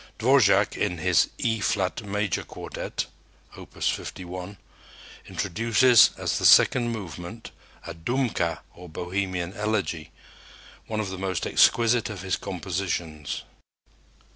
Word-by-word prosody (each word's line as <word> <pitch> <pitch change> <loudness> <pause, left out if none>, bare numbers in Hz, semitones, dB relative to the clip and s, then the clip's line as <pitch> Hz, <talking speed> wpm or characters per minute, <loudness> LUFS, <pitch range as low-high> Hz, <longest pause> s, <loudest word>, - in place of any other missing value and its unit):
Dvorak 110 -5 +4
in 90 -4 -1
his 90 0 +3
E 115 -1 0
flat 100 +2 -1
major 105 -1 -2
quartet - - -5 0.5
(Opus - - -5
51) 90 +2 -5 0.7
introduces 115 +6 +4
as - - -1
the - - -1
second 120 -2 +6
movement 95 +1 -7 0.3
a 85 - -6
Dumka 90 -1 -1
or 90 0 -12
Bohemian 90 +1 -3
elegy, 105 -7 -2 0.8
one 110 -1 -3
of 100 -3 -3
the 95 - -6
most 95 -3 -2
exquisite 115 -1 +3
of 100 -4 -7
his 95 - 0
compositions. 85 -4 -4
95 Hz, 115 wpm, -25 LUFS, 90-110 Hz, 0.8 s, second